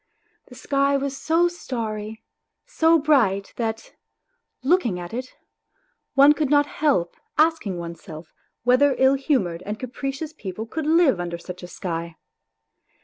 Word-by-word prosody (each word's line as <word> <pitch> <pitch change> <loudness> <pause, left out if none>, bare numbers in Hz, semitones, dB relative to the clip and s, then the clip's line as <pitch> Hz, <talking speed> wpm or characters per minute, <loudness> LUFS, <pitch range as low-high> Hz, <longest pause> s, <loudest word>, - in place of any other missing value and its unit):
The - - -14
sky 275 0 +1
was 275 0 -3
so 330 +4 +2
starry, 220 -9 -5 0.4
so 330 -9 +3
bright 245 -11 +2
that, 225 -1 -3 0.7
looking 260 - +2
at 175 +2 -8
it, 255 +2 -6 0.8
one 280 +2 +7
could 300 -2 -1
not 290 0 +4
help 280 - 0 0.2
asking 310 - +2
oneself 170 -1 -9 0.3
whether 255 +3 +4
ill 265 +1 +5
humoured 250 - 0
and 210 +1 -4
capricious 270 +5 -5
people 215 - -6
could 305 +6 -4
live 315 - +4
under 175 -1 -3
such 180 +1 -9
a 175 - -8
sky. 170 -2 -5
255 Hz, 135 wpm, -23 LUFS, 190-295 Hz, 0.8 s, one